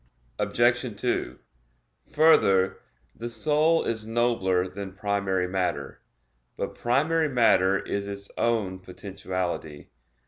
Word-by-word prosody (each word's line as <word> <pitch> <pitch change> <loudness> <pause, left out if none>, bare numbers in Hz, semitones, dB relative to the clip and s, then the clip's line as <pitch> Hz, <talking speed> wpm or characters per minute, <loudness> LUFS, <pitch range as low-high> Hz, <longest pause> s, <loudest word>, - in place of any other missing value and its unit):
Obj. 120 +1 +2 0.2
2: 125 - -1 0.8
Further, 100 -12 +4 0.4
the 120 +1 -5
soul 155 +6 +2
is 110 -1 -3
nobler 110 -6 +1
than 95 +1 -7
primary 100 -2 -1
matter. 90 -7 -3 0.6
But - - -3
primary 155 +6 +1
matter 100 -7 +4
is 100 0 -4
its 100 0 -7
own 105 -6 0
potentiality. 90 -5 -5
100 Hz, 100 wpm, -26 LUFS, 95-120 Hz, 0.8 s, Further